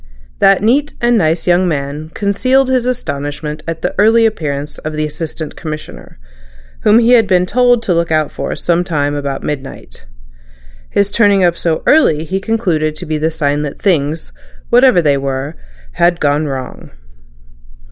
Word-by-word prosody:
That 195 0 +4
neat 280 +7 +1
and 240 0 +2
nice 165 -5 +1
young 180 +1 +3
man 150 0 -3
concealed 255 +6 +1
his 255 -2 +1
astonishment 150 - -4
at 165 -1 -5
the - - -1
early 225 +2 +5
appearance 150 -8 -3
of 155 - -5
the 155 0 -1
Assistant 155 0 -6
Commissioner, 155 - -8 0.6
whom 215 - +4
he 235 +1 +4
had 230 -4 +5
been 180 -1 +2
told 245 +3 +2
to 195 - 0
look 170 -1 0
out 155 -2 +1
for - - -4
some 175 0 0
time 145 -5 -1
about 140 -2 -4
midnight. 135 - -7 0.8
His 200 0 0
turning 205 -4 +3
up 175 -1 +3
so 165 -2 -2
early 160 - +3
he 190 +4 -2
concluded 180 -8 -1
to 165 - -7
be 155 -1 -2
the 160 +1 +1
sign 145 -2 -1
that 150 -2 -5
things, 160 -4 -1 0.4
whatever 245 -7 +5
they 145 -2 +3
were, 135 +3 -4 0.4
had 170 0 +1
gone 145 +1 +1
wrong. 130 -2 -6
165 Hz, 165 wpm, -15 LUFS, 150-205 Hz, 0.8 s, early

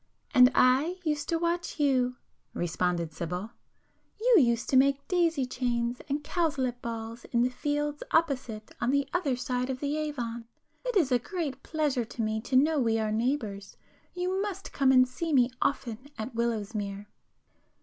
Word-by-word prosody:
"And 250 0 +8
I 275 +8 +4
used 300 -3 -1
to 330 - +2
watch 340 0 -2
you,"—responded 180 - -1
Sibyl—"You 195 - -3
used 235 -3 +2
to - - +3
make 275 +1 +3
daisy 335 -6 +2
chains 245 -1 -1
and 290 +2 -1
cowslip 285 -7 -1
balls 230 0 -6
in 235 -1 +1
the 250 - +1
fields 295 +2 -2
opposite 260 -9 0
on 240 - +1
the 280 0 +2
other 305 -8 +1
side 250 +1 -2
of 260 -1 -3
the 290 +2 -1
Avon. 240 -7 -3 0.4
It - - -2
is 320 -9 +3
a 250 - +4
great 285 -2 -4
pleasure 295 -6 0
to 230 - -6
me 215 0 -1
to 255 - -3
know 300 +3 +4
we 225 -3 +2
are 215 -1 -1
neighbours. 215 -4 -2 0.4
You 365 +2 -1
must 400 -2 -5
come 270 -2 +4
and 255 -1 +6
see 315 +6 -3
me 250 -2 +4
often 255 -1 -2
at 220 +3 -5
Willowsmere." 210 -3 -2
255 Hz, 160 wpm, -29 LUFS, 235-295 Hz, 0.4 s, And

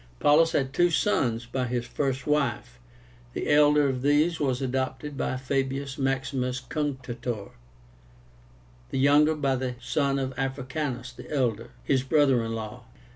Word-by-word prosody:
Paullus 160 +3 +4
had 135 -1 0
two 175 +2 +4
sons 125 - +1
by 125 +1 -2
his 120 0 -2
first 135 +1 -2
wife. 140 -4 -1 0.5
The - - -2
elder 150 0 +5
of 130 -2 -2
these 150 +4 +2
was 130 -4 0
adopted 130 +2 -3
by 130 - -2
Fabius 135 +1 -2
Maximus 135 -1 -1
Cunctátor, 125 -6 -4 1.4
the - - -3
younger 145 +3 +5
by 140 -3 +1
the 130 -1 -3
son 140 +2 0
of 135 -1 -2
Africánus 130 -1 -3
the - - -11
elder, 120 -5 0
his 135 -2 +2
brother 135 -3 +3
in 115 0 -3
law. 115 +2 -7
135 Hz, 140 wpm, -27 LUFS, 125-145 Hz, 1.4 s, elder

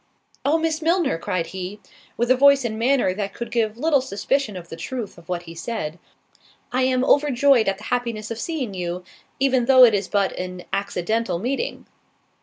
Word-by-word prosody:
"Oh, 295 +4 +3
Miss 320 0 -1
Milner," 330 - +1
cried 170 0 -2
he, 190 +2 -6 0.4
(with 240 +2 +1
a - - +7
voice 280 0 +5
and 220 -1 -3
manner 245 -5 +2
that 200 0 -4
could 235 - -6
give 225 -2 0
little 290 0 +2
suspicion 240 -1 -1
of 175 -1 -10
the - - -6
truth 235 +5 -5
of 170 - -20
what 175 -1 -2
he 165 -1 -10
said) 170 -2 -5 0.7
"I 255 +1 +1
am 255 0 +2
overjoyed 280 -4 +4
at 195 0 +1
the 210 - -13
happiness 235 -3 -2
of 230 - -4
seeing 275 - -3
you, 180 -1 -4 0.4
even 260 -2 +2
though 260 0 +7
it 235 -3 +7
is 200 -2 0
but 200 -2 +1
an 180 0 -5
accidental 200 +1 -1
meeting." 265 - -3
230 Hz, 190 wpm, -23 LUFS, 190-265 Hz, 0.7 s, a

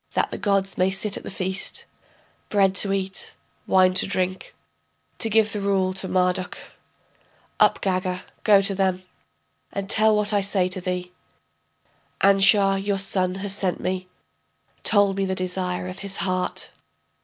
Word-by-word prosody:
That - - 0
the - - -5
gods 195 -2 0
may 185 +1 +3
sit 200 +1 0
at - - -5
the - - -8
feast, 190 0 -3 0.6
Bread 195 -2 +3
to 195 - +3
eat, 190 -1 -3 0.3
wine 185 -1 +4
to 185 - +5
drink, 185 -1 -3 0.6
To 225 - -1
give 220 0 +2
the 210 - -2
rule 190 -2 +1
to 190 0 -4
Marduk. 180 0 0 1.0
Up - - +4
Gaga, 185 -1 -1 0.2
to 200 -1 +5
them 190 -1 +1
go, 185 - -22 0.7
And 200 0 -4
tell 215 +1 +4
what 210 0 +1
I 205 - +3
say 195 -2 +1
to 185 0 -2
thee: 180 0 -4 1.1
Anshar, 195 0 +4
your 200 -1 0
son, 185 -1 0
has 195 - +2
sent 195 -3 -1
me, 185 0 -3 0.7
Told 200 -2 +2
me 195 - 0
the 190 0 -2
desire 180 0 -2
of 185 +1 -7
his 200 0 -5
heart. 185 -2 -2
190 Hz, 155 wpm, -23 LUFS, 185-200 Hz, 1.1 s, to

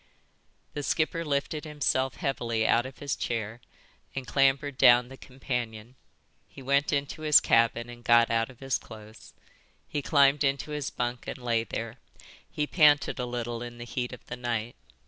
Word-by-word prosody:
The 145 - -4
skipper 160 +3 0
lifted 150 0 -2
himself 140 -4 -1
heavily 115 -7 -1
out 120 +2 +2
of 130 - -12
his 140 -1 -3
chair 115 0 -4 0.5
and 135 -1 -4
clambered 135 +1 +2
down 125 -1 +6
the 135 - -10
companion. 125 -4 -5 0.5
He 135 - -13
went 140 +2 +2
into 145 +2 -2
his 155 -1 +6
cabin 115 +1 +2
and 120 0 -11
got 120 -1 +5
out 115 0 +1
of 130 -1 -16
his 135 -1 -1
clothes. 110 -1 -13 0.5
He 145 - -3
climbed 140 0 +4
into 140 +2 -1
his 150 -3 -3
bunk 120 0 -4
and - - -5
lay 120 -2 -1
there. 115 +1 -5 0.5
He 150 - -2
panted 150 -4 +3
a 125 - -2
little 120 -1 -4
in 120 0 -7
the 120 - -7
heat 125 0 -4
of 125 - -11
the 120 - -7
night. 120 -1 -3
125 Hz, 170 wpm, -28 LUFS, 120-140 Hz, 0.5 s, down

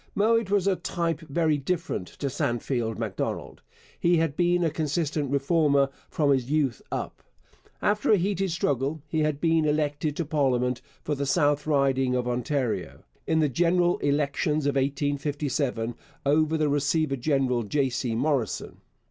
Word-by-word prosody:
Mowat 225 0 +2
was 200 -2 +2
of 195 -2 +1
a - - -29
type 165 -3 -1
very 155 -1 0
different 160 - -2
to - - -7
Sandfield 120 -3 -1
Macdonald. - - -4 0.4
He 170 0 +3
had 160 -3 0
been 175 +1 +2
a 165 - +1
consistent 150 -1 -1
Reformer 140 0 +2 0.2
from 145 -3 +1
his 130 -2 +1
youth 145 -6 0
up. - - -4 0.6
After 210 +1 +2
a 210 - +6
heated 195 +1 0
struggle, 145 -2 -1
he 160 +1 -1
had 150 -2 0
been 165 -1 +2
elected 150 0 0
to 170 - -2
parliament 125 -4 +1 0.2
for 150 - -1
the 140 -1 -2
South 145 0 +2
Riding 135 -3 +2
of 125 -1 -1
Ontario, 125 - -2 0.2
in 160 0 +2
the 150 - +3
general 175 +5 +2
elections 145 +1 0
of 145 - +2
1857, 140 -3 -1 0.3
over 155 +2 +3
the 155 -1 +1
receiver 145 +1 +1
general 130 -2 +1
J. 135 +5 0
C. 120 -2 -2
Morrison. 130 - -1
145 Hz, 155 wpm, -26 LUFS, 135-160 Hz, 0.6 s, a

